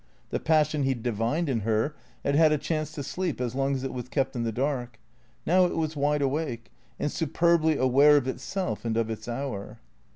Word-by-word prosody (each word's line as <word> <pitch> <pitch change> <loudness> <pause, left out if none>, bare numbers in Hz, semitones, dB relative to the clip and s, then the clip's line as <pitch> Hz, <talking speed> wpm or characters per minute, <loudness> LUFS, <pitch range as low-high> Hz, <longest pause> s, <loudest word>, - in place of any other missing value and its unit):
The - - 0
passion 155 -2 +2
he 135 -1 +1
divined 120 +7 -1
in 130 -5 0
her 110 +6 0 0.3
had 140 - +2
had 155 +1 +5
a 150 - +3
chance 155 0 -2
to 145 - -5
sleep 175 +2 -3
as 125 -2 -2
long 135 +1 0
as 130 - -4
it 135 - -3
was 125 -1 -6
kept 135 -1 -1
in 120 - -1
the 115 -1 -1
dark. 125 -2 -2 0.5
Now 185 +2 +5
it 175 - -2
was 160 -1 -1
wide 145 0 +1
awake, 135 -6 -2 0.3
and 145 - -1
superbly 160 0 +2
aware 140 +3 +5
of 135 -3 0
itself 130 - -3
and 115 -1 -1
of 115 -1 0
its 110 - -6
hour. 120 -4 -4
140 Hz, 205 wpm, -27 LUFS, 120-155 Hz, 0.5 s, had